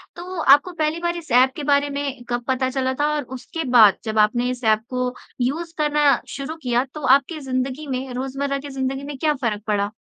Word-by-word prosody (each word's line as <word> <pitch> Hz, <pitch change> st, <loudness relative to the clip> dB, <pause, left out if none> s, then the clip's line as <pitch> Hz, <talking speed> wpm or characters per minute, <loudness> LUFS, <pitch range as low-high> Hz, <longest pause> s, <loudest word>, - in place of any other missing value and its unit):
तो 355 Hz, 0 st, -6 dB
आपको 290 Hz, +6 st, +5 dB
पहली 315 Hz, 0 st, -1 dB
बार 345 Hz, 0 st, -1 dB
इस 320 Hz, -6 st, -9 dB
ऐप 255 Hz, +2 st, +5 dB
के 295 Hz, -, -5 dB
बारे 285 Hz, 0 st, +2 dB
में 280 Hz, -3 st, -4 dB
कब 240 Hz, 0 st, -1 dB
पता 260 Hz, 0 st, +1 dB
चला 260 Hz, 0 st, -1 dB
था? 290 Hz, +3 st, 0 dB
और 295 Hz, -, -2 dB
उसके 260 Hz, +6 st, -6 dB
बाद 220 Hz, -6 st, +7 dB
जब 220 Hz, -1 st, -1 dB
आपने 240 Hz, +4 st, +2 dB
इस 250 Hz, -1 st, -5 dB
ऐप 220 Hz, 0 st, +3 dB
को 250 Hz, 0 st, -2 dB, 0.3 s
यूज़ 325 Hz, +7 st, -2 dB
करना 295 Hz, -1 st, +3 dB
शुरू 280 Hz, +3 st, -5 dB
किया 245 Hz, 0 st, +1 dB
तो 305 Hz, -, -7 dB
आपकी 280 Hz, +5 st, +3 dB
ज़िन्दगी 265 Hz, +2 st, -3 dB
में, 260 Hz, -1 st, -4 dB
रोज़मर्रा 275 Hz, +2 st, -2 dB
की 285 Hz, +1 st, -8 dB
ज़िन्दगी 270 Hz, 0 st, -3 dB
में 285 Hz, -1 st, -6 dB
क्या 305 Hz, +2 st, +1 dB
फ़र्क 210 Hz, -3 st, -1 dB
पड़ा? 205 Hz, 0 st, 0 dB
270 Hz, 215 wpm, -22 LUFS, 250-295 Hz, 0.3 s, बाद